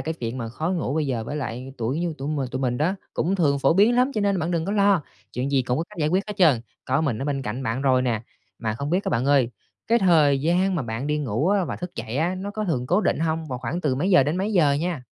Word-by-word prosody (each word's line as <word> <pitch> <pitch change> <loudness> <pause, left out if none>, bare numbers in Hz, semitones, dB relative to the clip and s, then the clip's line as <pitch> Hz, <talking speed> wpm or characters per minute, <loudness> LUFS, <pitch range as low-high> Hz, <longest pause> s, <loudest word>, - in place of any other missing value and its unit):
cái 160 +1 -3
chuyện 120 -3 -5
mà 115 - -4
khó 155 +8 -3
ngủ 165 -6 -1
bây 155 -2 0
giờ 115 -4 -2
với 145 - -4
lại 130 -1 -5
tuổi 125 +7 -1
như 170 -2 -2
tụi 140 +2 -4
mình 140 -4 -1
tụi 130 +1 -3
mình 125 -2 0
đó 165 +6 +1 0.2
cũng 185 +5 0
thường 145 -6 +2
phổ 135 +4 +3
biến 215 +5 +5
lắm, 255 +2 +3
cho 215 - 0
nên 200 -2 +1
bạn 165 +1 -1
đừng 165 -2 0
có 200 - -2
lo, 200 -5 +3 0.3
chuyện 130 +3 -2
gì 135 -2 +2
cũng 125 +2 -1
có 165 - -1
cách - - -13
giải 150 -1 +1
quyết 185 +4 +1
hết 210 - -4
trơn, 155 -11 +4 0.2
có 130 +3 +1
mình 140 -9 -1
ở - - -2
bên 140 -2 -2
cạnh 120 +2 -4
bạn 120 +2 -2
rồi 130 -2 +3
nè. 115 -3 -1 0.4
Mà 110 -1 -2
không 140 +4 -4
biết 185 +4 +1
á - - -1
bạn 125 +1 0
ơi, 135 -4 +3 0.4
cái 235 +1 +4
thời 155 -8 +4
gian 180 +5 +2
mà 165 - -1
bạn 115 +3 -4
đi 150 0 0
ngủ 135 - 0
á 200 -1 +2
và - - -4
thức 180 0 -6
dậy 115 +4 -5
á, 170 +4 +1
nó 195 +2 -5
có 215 +1 -3
thường 130 -10 -1
cố 180 +7 +3
định - - +1
hông? 160 0 -1
Và 130 - -3
khoảng 130 +8 -3
từ 140 -6 0
mấy 175 +9 0
giờ 180 -7 +7
đến 150 +5 -1
mấy 200 +3 -1
giờ 155 -7 +4
nha? 160 -1 -2
150 Hz, 305 wpm, -24 LUFS, 130-180 Hz, 0.4 s, giờ